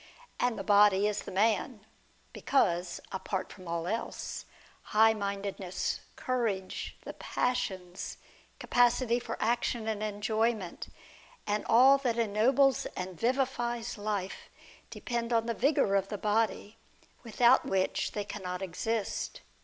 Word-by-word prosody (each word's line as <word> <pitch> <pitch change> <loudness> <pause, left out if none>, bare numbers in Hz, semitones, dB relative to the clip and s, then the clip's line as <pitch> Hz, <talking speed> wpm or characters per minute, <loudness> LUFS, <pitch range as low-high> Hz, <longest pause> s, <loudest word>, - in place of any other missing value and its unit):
And 245 -2 +1
the - - -4
body 205 -1 +5
is 210 - -1
the - - -8
man; 215 +3 +1 0.5
because 175 -9 +1
(apart 190 0 -3
from 185 -3 -13
all 170 0 -2
else) 225 +6 -4 0.5
high 220 0 +7
mindedness, 200 -3 -3 0.2
courage, 225 -7 -2
the - - -7
passions, 190 -8 -3 0.4
capacity 245 0 +2
for 230 -1 -5
action 235 0 0
and 215 -2 -2
enjoyment, 215 -1 -1 0.6
and 210 +1 -1
all 265 +4 +7
that 245 -4 -1
ennobles 235 +5 +3
and 185 0 -4
vivifies 240 -2 0
life, 205 -2 -4 0.4
depend 235 -1 -3
on 230 -1 +2
the 230 - -1
vigour 245 -4 +2
of 195 -1 +2
the 210 - -4
body, 215 0 0 0.5
without 240 +2 +4
which 190 -1 0
they 205 - -2
cannot 180 -1 -5
exist. 210 +4 -3
215 Hz, 120 wpm, -30 LUFS, 195-235 Hz, 0.6 s, high